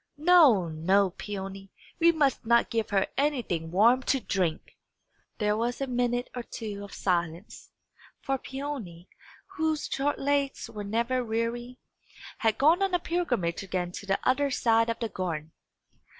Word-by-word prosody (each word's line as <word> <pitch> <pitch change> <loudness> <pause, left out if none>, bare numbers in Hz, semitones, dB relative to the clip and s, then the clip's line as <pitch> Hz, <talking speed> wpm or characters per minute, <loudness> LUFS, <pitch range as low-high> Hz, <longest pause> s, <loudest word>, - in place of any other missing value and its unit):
No, 300 - +6
no, 185 +5 +2
Peony; 195 0 -7 0.3
we 335 0 +6
must 295 -5 +1
not 235 +1 +3
give 225 -2 -1
her 195 -2 +2
anything 245 - -1
warm 225 +9 +4
to 270 +1 +1
drink!" 180 -8 -2 0.6
There 210 -1 +1
was 235 +2 -1
a 275 - -1
minute 245 -1 -1
or 245 - -3
two 210 -3 -7
of 200 - -10
silence; 175 0 -3 0.5
for 270 -1 -2
Peony, 255 -13 -6 0.5
whose 315 -1 0
short 285 +2 -1
legs 280 -1 -1
were 210 -2 -6
never 235 +5 0
weary, 235 +2 -3 0.6
had 220 -1 +1
gone 320 +7 +4
on 385 -2 +2
a - - +2
pilgrimage 260 - -1
again 180 -2 -3
to 200 - -8
the 195 0 +2
other 280 +2 +2
side 230 -3 +2
of 230 - -1
the 230 -2 -3
garden. 165 -5 -4
230 Hz, 150 wpm, -28 LUFS, 195-270 Hz, 0.6 s, No